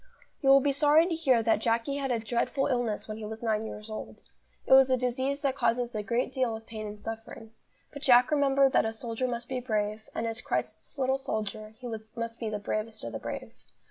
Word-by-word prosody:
You 270 - +3
will 275 0 +8
be 285 +1 +2
sorry 295 +3 +5
to 350 - -1
hear 265 -8 +3
that 225 -1 +3
Jacky 230 +5 0
had 275 -1 -2
a 240 - +2
dreadful 235 +4 0
illness 245 -5 -1
when 215 0 -5
he 220 - -6
was 220 +2 -7
nine 220 -1 0
years 210 0 -7
old. 215 -1 -8 0.4
It - - +4
was 265 0 +8
a 255 - +3
disease 260 +3 -1
that 270 -2 +1
causes 240 -1 0
a 215 - -2
great 235 +5 -1
deal 255 -4 0
of 220 0 -10
pain 215 -2 -6
and 210 0 -8
suffering. 225 0 -7 0.4
But 285 - -8
Jack 250 0 +6
remembered 275 -2 +4
that - - +5
a 220 - -2
soldier 230 +2 -2
must 240 0 -4
be 260 -1 -2
brave, 215 -3 -2
and, 230 - -1
as 225 +1 -3
Christ's - - -3
little 265 0 +1
soldier, 215 -4 -4
he 255 - -11
must 230 +1 -6
be 225 - -2
the 210 - -2
bravest 215 +2 -3
of 115 - -5
the 110 - -5
brave. - - -6
235 Hz, 230 wpm, -29 LUFS, 220-265 Hz, 0.4 s, will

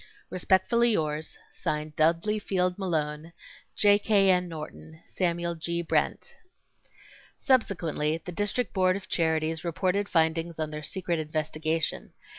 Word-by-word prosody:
Respectfully 220 +6 +3
yours, 155 -3 -2
(Signed) 150 0 -3
DUDLEY 170 +7 +2
FIELD 185 -2 -1
MALONE, 160 -3 -2 0.4
J. 205 -1 +5
K. 200 -3 +4
N. 180 -1 +2
NORTON, 160 0 -9
SAMUEL 170 -1 -1
G. 170 +1 -3
BRENT. 165 - -1 1.0
Subsequently 170 - +1
the 180 - -5
District 205 +4 -1
Board 185 -1 +3
of 200 - -7
Charities 160 -1 0
reported 185 +4 0
findings 165 0 +1
on 155 -1 -3
their 150 0 -5
secret 175 +1 -1
investigation. 155 +1 -2
170 Hz, 120 wpm, -28 LUFS, 155-190 Hz, 1.0 s, J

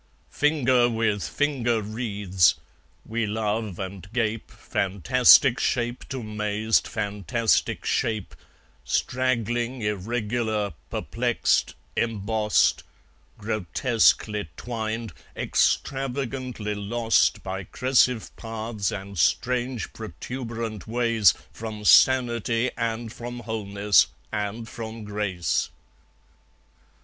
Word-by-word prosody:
Finger 130 -5 +3
with 110 -3 0
finger 125 -6 0
wreathes; 100 -6 +1 0.5
we 115 0 -1
love, 105 -2 -2
and 95 0 -7
gape, 115 -2 -1
Fantastic 120 - +4
shape 120 0 -1
to 130 -3 -4
mazed 105 +1 0
fantastic 105 +3 0
shape, 110 -4 -1 0.5
Straggling, 120 - -1
irregular, 105 0 -1 0.2
perplexed, - - 0 0.2
embossed, 110 -1 +1 0.6
Grotesquely 105 -1 +1
twined, 115 -3 -4 0.2
extravagantly 130 -4 -1
lost 110 +3 +1
By 95 0 -4
crescive 125 +2 +1
paths 110 -2 -3
and 100 -2 -6
strange 125 +5 0
protuberant 115 -2 -6
ways 115 -5 +3 0.2
From 110 -2 -7
sanity 120 -1 +4
and 115 0 -3
from 120 0 -7
wholeness 105 -2 +2 0.2
and 105 +2 -3
from 115 -1 -7
grace. 100 -6 -1
110 Hz, 80 wpm, -25 LUFS, 105-120 Hz, 0.6 s, Fantastic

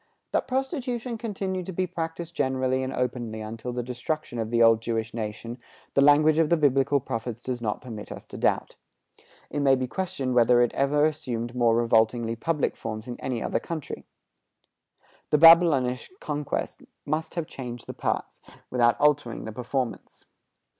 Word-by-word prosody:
That - - 0
prostitution 255 -3 -2
continued 190 -5 -3
to - - -3
be 185 +1 -1
practiced 170 -1 -5
generally 130 -2 0
and 130 0 -3
openly 120 -4 -3
until 115 +3 -5
the 125 0 -3
destruction 125 +2 -4
of 110 -1 -2
the 115 0 +3
old 115 -1 +5
Jewish 115 -1 -2
nation, 115 +2 -5 0.3
the 140 - +4
language 150 +2 +5
of 160 -2 +3
the 170 - +4
Biblical 140 -1 +3
prophets 120 -1 -5
does 125 -2 -3
not 105 -2 -2
permit 110 -4 -8
us - - -8
to - - -8
doubt. - - 0 0.7
It 145 - -2
may 135 -2 +5
be 130 0 -1
questioned 155 -4 -3
whether 120 0 +5
it 120 - 0
ever 145 +2 +2
assumed 120 -6 -2
more 120 -2 +3
revoltingly 115 0 +2
public 150 +5 -1
forms 110 +1 -6
in 120 - -6
any 125 -3 -3
other - - 0
country. 160 -4 -6 1.2
The 150 - +4
Babylonish 155 -6 +6
conquest 150 -1 -3 0.2
must 160 +3 -2
have 170 -2 -1
changed 125 -5 -8
the - - -7
parts, - - -3 0.3
without 120 -2 +3
altering 145 -5 +1
the 110 - -5
performance. 125 +2 -4
130 Hz, 165 wpm, -26 LUFS, 120-155 Hz, 1.2 s, Babylonish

